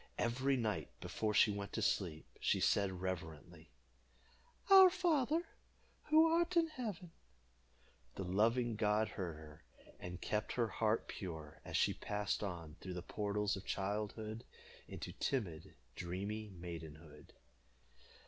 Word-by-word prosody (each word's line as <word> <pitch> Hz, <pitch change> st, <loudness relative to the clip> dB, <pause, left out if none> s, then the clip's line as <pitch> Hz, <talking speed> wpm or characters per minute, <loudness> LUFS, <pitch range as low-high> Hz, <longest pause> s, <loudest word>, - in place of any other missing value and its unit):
Every 130 Hz, +3 st, +1 dB
night, 105 Hz, -10 st, -1 dB
before 105 Hz, -1 st, -2 dB
she 110 Hz, -, +6 dB
went 100 Hz, 0 st, -5 dB
to 110 Hz, -, -1 dB
sleep, 85 Hz, -5 st, 0 dB
she -, -, +2 dB
said 100 Hz, -2 st, +3 dB
reverently 85 Hz, -2 st, -5 dB, 1.0 s
"Our 380 Hz, -1 st, +11 dB
Father, 330 Hz, -4 st, +2 dB, 0.6 s
who 310 Hz, +2 st, +6 dB
art 340 Hz, +2 st, +2 dB
in 330 Hz, -1 st, +4 dB
heaven." 210 Hz, -, -5 dB, 1.0 s
The 95 Hz, -, -3 dB
loving 115 Hz, +5 st, +2 dB
God 105 Hz, 0 st, +2 dB
heard 90 Hz, -5 st, -4 dB
her, 75 Hz, 0 st, -12 dB, 0.4 s
and 90 Hz, 0 st, -6 dB
kept 105 Hz, +1 st, -1 dB
her 115 Hz, -2 st, +1 dB
heart 110 Hz, +2 st, +1 dB
pure, 80 Hz, -5 st, -7 dB
as -, -, -2 dB
she -, -, +3 dB
passed 105 Hz, -1 st, -2 dB
on 85 Hz, -6 st, -5 dB
through 90 Hz, -1 st, -5 dB
the 90 Hz, -, -5 dB
portals 105 Hz, -1 st, -1 dB
of 95 Hz, -, -7 dB
childhood 105 Hz, +3 st, -3 dB, 0.4 s
into -, -, -6 dB
timid, 95 Hz, -, -2 dB, 0.2 s
dreamy 100 Hz, +5 st, -4 dB
maidenhood. 85 Hz, -4 st, -9 dB
105 Hz, 130 wpm, -37 LUFS, 90-120 Hz, 1.0 s, Our